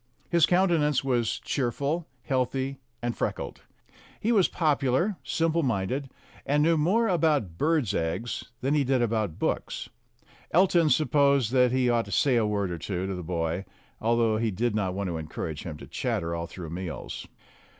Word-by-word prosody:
His 170 Hz, -2 st, +5 dB
countenance 170 Hz, -7 st, +3 dB
was 120 Hz, -4 st, +1 dB
cheerful, 140 Hz, +6 st, -1 dB, 0.2 s
healthy, 130 Hz, +1 st, -1 dB, 0.2 s
and 120 Hz, 0 st, -1 dB
freckled. -, -, -3 dB, 0.6 s
He 225 Hz, -, +1 dB
was 200 Hz, -6 st, +5 dB
popular, 155 Hz, +4 st, +1 dB
simple 165 Hz, 0 st, +1 dB
minded, 130 Hz, +2 st, -1 dB, 0.3 s
and 145 Hz, +1 st, +2 dB
knew 165 Hz, +1 st, +4 dB
more 190 Hz, +10 st, +2 dB
about 150 Hz, -, +1 dB
birds' 150 Hz, -, +2 dB
eggs 85 Hz, +9 st, -2 dB, 0.2 s
than 135 Hz, +3 st, +1 dB
he 150 Hz, -2 st, +3 dB
did 130 Hz, -2 st, +2 dB
about 110 Hz, -7 st, -1 dB
books. -, -, -2 dB, 0.6 s
Elton 170 Hz, -2 st, +4 dB
supposed 140 Hz, -5 st, +3 dB
that 125 Hz, -2 st, +4 dB
he 130 Hz, -1 st, +2 dB
ought 120 Hz, -1 st, +2 dB
to -, -, -10 dB
say 135 Hz, -3 st, +3 dB
a 115 Hz, -3 st, +3 dB
word 100 Hz, -3 st, -1 dB
or 85 Hz, -, -4 dB
two 90 Hz, +2 st, -3 dB
to 95 Hz, -, -3 dB
the 90 Hz, -, -4 dB
boy, 85 Hz, +1 st, -2 dB, 0.4 s
although 115 Hz, -1 st, +2 dB
he 115 Hz, 0 st, 0 dB
did 110 Hz, +4 st, -1 dB
not 95 Hz, -3 st, -1 dB
want 100 Hz, 0 st, -2 dB
to 85 Hz, -2 st, -2 dB
encourage 80 Hz, -1 st, -5 dB
him 80 Hz, -3 st, -5 dB
to -, -, -10 dB
chatter 85 Hz, 0 st, -2 dB
all 85 Hz, 0 st, -3 dB
through 85 Hz, -3 st, -8 dB
meals. 90 Hz, -1 st, -6 dB
125 Hz, 170 wpm, -27 LUFS, 95-150 Hz, 0.6 s, His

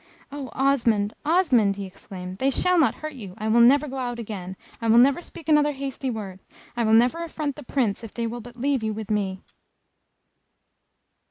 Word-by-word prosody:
"Oh, 280 Hz, -3 st, -6 dB
Osmond! 230 Hz, -7 st, +2 dB
Osmond!" 290 Hz, -, +3 dB
he 200 Hz, 0 st, -5 dB
exclaimed, 185 Hz, -1 st, -9 dB
"they 270 Hz, -, +2 dB
shall 360 Hz, +6 st, +2 dB
not 275 Hz, -8 st, +3 dB
hurt 310 Hz, -, -4 dB
you. 200 Hz, -9 st, -9 dB
I 215 Hz, -, -3 dB
will 225 Hz, +2 st, +4 dB
never 280 Hz, +5 st, +5 dB
go 270 Hz, 0 st, -6 dB
out 245 Hz, -2 st, -3 dB
again. 190 Hz, -5 st, -6 dB, 0.2 s
I 230 Hz, -, -1 dB
will 225 Hz, +1 st, +5 dB
never 270 Hz, +7 st, +5 dB
speak 330 Hz, -2 st, -12 dB
another 300 Hz, -1 st, +4 dB
hasty 270 Hz, -1 st, -4 dB
word. 200 Hz, -5 st, -6 dB, 0.4 s
I 240 Hz, -, 0 dB
will 220 Hz, -, +3 dB
never 250 Hz, +9 st, +3 dB
affront 305 Hz, -4 st, -4 dB
the -, -, -9 dB
Prince, 240 Hz, -6 st, -1 dB
if 225 Hz, -, -8 dB
they 235 Hz, -, -2 dB
will 235 Hz, +1 st, -4 dB
but 240 Hz, +2 st, -13 dB
leave 270 Hz, 0 st, 0 dB
you 220 Hz, -1 st, -2 dB
with 215 Hz, 0 st, -6 dB
me!" 195 Hz, -3 st, -1 dB
240 Hz, 195 wpm, -24 LUFS, 215-280 Hz, 0.4 s, never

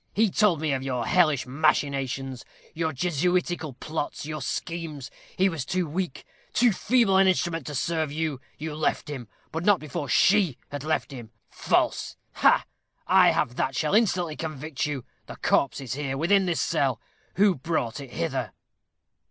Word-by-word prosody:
He 220 Hz, -1 st, +3 dB
told 185 Hz, -8 st, +3 dB
me 155 Hz, -2 st, 0 dB
of 130 Hz, -, -1 dB
your 125 Hz, -3 st, -2 dB
hellish 155 Hz, -3 st, +3 dB
machinations; 135 Hz, -2 st, 0 dB, 0.3 s
your 160 Hz, 0 st, -1 dB
Jesuitical 175 Hz, +1 st, 0 dB
plots; 150 Hz, +3 st, -4 dB
your 155 Hz, -1 st, -5 dB
schemes. 155 Hz, 0 st, -4 dB, 0.3 s
He 190 Hz, -, +4 dB
was 165 Hz, -8 st, -2 dB
too 180 Hz, +4 st, -1 dB
weak, 170 Hz, 0 st, -4 dB, 0.3 s
too 240 Hz, +1 st, +4 dB
feeble 215 Hz, -1 st, +3 dB
an 195 Hz, 0 st, +5 dB
instrument 170 Hz, -5 st, 0 dB
to 145 Hz, -, -5 dB
serve 160 Hz, +1 st, -1 dB
you. 150 Hz, -3 st, -2 dB, 0.2 s
You 155 Hz, 0 st, -5 dB
left 150 Hz, 0 st, -1 dB
him, 125 Hz, -5 st, -6 dB, 0.2 s
but 160 Hz, +1 st, -3 dB
not 205 Hz, -2 st, +4 dB
before 145 Hz, -1 st, -5 dB
she 180 Hz, -, +4 dB
had 145 Hz, -1 st, -5 dB
left 155 Hz, -1 st, -1 dB
him. 120 Hz, -5 st, -8 dB, 0.2 s
False! -, -, 0 dB, 0.2 s
ha, -, -, +4 dB, 0.4 s
I -, -, +6 dB
have 120 Hz, -, 0 dB
that 130 Hz, -, 0 dB
shall 150 Hz, +5 st, 0 dB
instantly 185 Hz, -7 st, +2 dB
convict 155 Hz, -2 st, -4 dB
you. 140 Hz, -4 st, -4 dB, 0.2 s
The -, -, -8 dB
corpse 140 Hz, -, +1 dB
is 130 Hz, -2 st, -5 dB
here, 135 Hz, -1 st, -3 dB
within 190 Hz, +5 st, +3 dB
this 170 Hz, -, 0 dB
cell. 135 Hz, -8 st, +1 dB, 0.4 s
Who 200 Hz, +1 st, +5 dB
brought 135 Hz, -5 st, -2 dB
it 140 Hz, -2 st, -8 dB
hither?" 85 Hz, -, -3 dB
155 Hz, 165 wpm, -26 LUFS, 135-175 Hz, 0.4 s, I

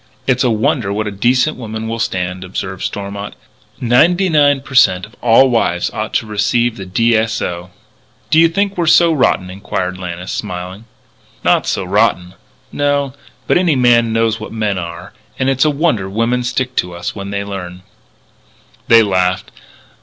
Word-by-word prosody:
"It's 130 Hz, 0 st, +2 dB
a 125 Hz, -, +2 dB
wonder 115 Hz, -1 st, 0 dB
what 105 Hz, +2 st, -2 dB
a 105 Hz, -, -3 dB
decent 125 Hz, +8 st, +1 dB
woman 110 Hz, -2 st, -6 dB
will 115 Hz, +1 st, -4 dB
stand," 90 Hz, -3 st, -2 dB
observed 95 Hz, 0 st, -5 dB
Stormont. 100 Hz, 0 st, -5 dB, 0.4 s
"Ninety 165 Hz, +10 st, +3 dB
nine 145 Hz, -3 st, +3 dB
per 135 Hz, -, -12 dB
cent. 95 Hz, -8 st, +4 dB
of 110 Hz, -, -19 dB
all 125 Hz, +3 st, +5 dB
wives 90 Hz, -7 st, 0 dB
ought 110 Hz, +1 st, -4 dB
to -, -, +1 dB
receive 110 Hz, +3 st, 0 dB
the 95 Hz, -2 st, -8 dB
D. 115 Hz, +5 st, +2 dB
S. 115 Hz, +1 st, 0 dB
O." 90 Hz, +1 st, -4 dB, 0.6 s
"Do 160 Hz, -, +5 dB
you 165 Hz, 0 st, +6 dB
think 200 Hz, +2 st, -1 dB
we're 170 Hz, -, 0 dB
so 170 Hz, +1 st, +5 dB
rotten?" 95 Hz, -10 st, +1 dB
inquired 95 Hz, -1 st, -4 dB
Lannis, 90 Hz, +1 st, -6 dB
smiling. 90 Hz, +1 st, -6 dB, 0.6 s
"Not -, -, +2 dB
so -, -, -1 dB
rotten. 90 Hz, 0 st, +1 dB, 0.4 s
No. 145 Hz, -2 st, 0 dB, 0.3 s
But -, -, +3 dB
any 175 Hz, -5 st, +2 dB
man 120 Hz, -2 st, +3 dB
knows 115 Hz, 0 st, +1 dB
what 110 Hz, -, -8 dB
men 105 Hz, -4 st, -1 dB
are. 85 Hz, +2 st, -8 dB, 0.2 s
And 135 Hz, 0 st, +1 dB
it's 135 Hz, +2 st, +2 dB
a -, -, +4 dB
wonder 140 Hz, -, 0 dB
women 115 Hz, +5 st, 0 dB
stick 125 Hz, +1 st, -2 dB
to 90 Hz, -1 st, -1 dB
us 85 Hz, 0 st, -4 dB
when 100 Hz, -1 st, -6 dB
they 100 Hz, 0 st, -3 dB
learn." 90 Hz, -3 st, -7 dB, 1.0 s
They 115 Hz, -1 st, +7 dB
laughed. 95 Hz, -2 st, 0 dB
110 Hz, 175 wpm, -16 LUFS, 95-130 Hz, 1.0 s, They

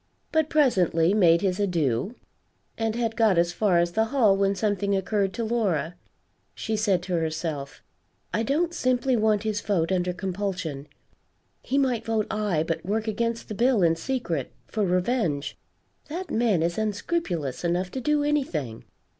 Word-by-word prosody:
But 315 Hz, -1 st, +2 dB
presently 185 Hz, -, +3 dB
made 170 Hz, -5 st, +5 dB
his 185 Hz, -1 st, 0 dB
adieux, 175 Hz, -, 0 dB, 0.6 s
and 225 Hz, -1 st, -1 dB
had 230 Hz, -2 st, -1 dB
got 220 Hz, -6 st, +3 dB
as 170 Hz, 0 st, +2 dB
far 190 Hz, -1 st, +2 dB
as 170 Hz, 0 st, +2 dB
the 220 Hz, +5 st, +2 dB
hall, 225 Hz, -5 st, +3 dB
when 195 Hz, 0 st, +1 dB
something 200 Hz, 0 st, 0 dB
occurred 195 Hz, 0 st, 0 dB
to 235 Hz, -, -3 dB
Laura. 205 Hz, -8 st, 0 dB, 0.6 s
She 220 Hz, -, -2 dB
said 200 Hz, -4 st, +1 dB
to 180 Hz, -, -4 dB
herself, 160 Hz, -4 st, -3 dB, 0.5 s
"I 220 Hz, -, +1 dB
don't 315 Hz, +8 st, 0 dB
simply 255 Hz, -2 st, +1 dB
want 215 Hz, -2 st, +2 dB
his 215 Hz, -1 st, -1 dB
vote 185 Hz, -5 st, 0 dB
under 180 Hz, -1 st, +1 dB
compulsion 180 Hz, -6 st, -4 dB, 0.7 s
he 275 Hz, -, -1 dB
might 255 Hz, -5 st, +1 dB
vote 225 Hz, -2 st, 0 dB
aye, 210 Hz, -7 st, 0 dB
but 165 Hz, -, -2 dB
work 215 Hz, +4 st, -2 dB
against 230 Hz, +2 st, -2 dB
the -, -, -5 dB
bill 235 Hz, -1 st, +3 dB
in 165 Hz, -1 st, +4 dB
secret, 170 Hz, -, -3 dB
for 215 Hz, -, -2 dB
revenge; 180 Hz, -, 0 dB, 0.5 s
that 350 Hz, +5 st, -5 dB
man 220 Hz, -8 st, +2 dB
is 170 Hz, +4 st, -1 dB
unscrupulous 205 Hz, -, -2 dB
enough 175 Hz, +2 st, 0 dB
to 260 Hz, -, -4 dB
do 300 Hz, +2 st, +1 dB
anything. 170 Hz, -, -2 dB
205 Hz, 160 wpm, -26 LUFS, 175-230 Hz, 0.7 s, made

